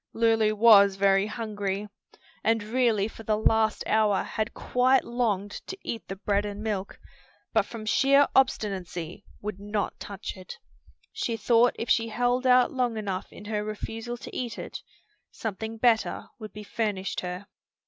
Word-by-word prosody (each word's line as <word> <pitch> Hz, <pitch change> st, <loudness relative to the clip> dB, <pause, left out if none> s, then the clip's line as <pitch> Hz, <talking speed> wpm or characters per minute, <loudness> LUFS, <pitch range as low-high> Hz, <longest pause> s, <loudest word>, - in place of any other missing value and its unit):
Lulu 225 Hz, -2 st, +3 dB
was 205 Hz, -3 st, +7 dB
very 195 Hz, +1 st, +3 dB
hungry, 210 Hz, -3 st, -3 dB, 0.6 s
and 225 Hz, -1 st, +2 dB
really 220 Hz, -2 st, +1 dB
for 225 Hz, -, -11 dB
the 215 Hz, -1 st, 0 dB
last 220 Hz, 0 st, +2 dB
hour 215 Hz, -2 st, +2 dB
had 215 Hz, 0 st, -3 dB
quite 255 Hz, +2 st, +2 dB
longed 215 Hz, -5 st, -1 dB, 0.2 s
to 385 Hz, -, -6 dB
eat 230 Hz, -, -5 dB
the 195 Hz, -, -5 dB
bread 200 Hz, +1 st, 0 dB
and 205 Hz, 0 st, -5 dB
milk, 200 Hz, -3 st, -3 dB, 0.5 s
but 220 Hz, -2 st, +2 dB
from 225 Hz, -2 st, -8 dB
sheer 275 Hz, +4 st, +4 dB
obstinacy 195 Hz, -8 st, 0 dB, 0.2 s
would 205 Hz, -2 st, -5 dB
not 205 Hz, 0 st, -3 dB
touch 200 Hz, -1 st, -6 dB
it. 185 Hz, -1 st, -9 dB, 0.6 s
She 325 Hz, -, -2 dB
thought 235 Hz, +3 st, +3 dB
if 230 Hz, -, -4 dB
she 230 Hz, -2 st, +2 dB
held 245 Hz, +3 st, 0 dB
out 250 Hz, 0 st, +5 dB
long 245 Hz, -3 st, 0 dB
enough 195 Hz, -3 st, -4 dB
in 210 Hz, -, -12 dB
her 210 Hz, 0 st, -2 dB
refusal 225 Hz, +3 st, -5 dB
to -, -, -10 dB
eat 240 Hz, -3 st, -3 dB
it, -, -, -6 dB, 0.5 s
something 220 Hz, +1 st, -5 dB
better 225 Hz, -1 st, +1 dB
would 215 Hz, -1 st, -8 dB
be 210 Hz, -, -9 dB
furnished 205 Hz, -3 st, -2 dB
her. 180 Hz, +2 st, -5 dB
215 Hz, 160 wpm, -27 LUFS, 205-235 Hz, 0.6 s, was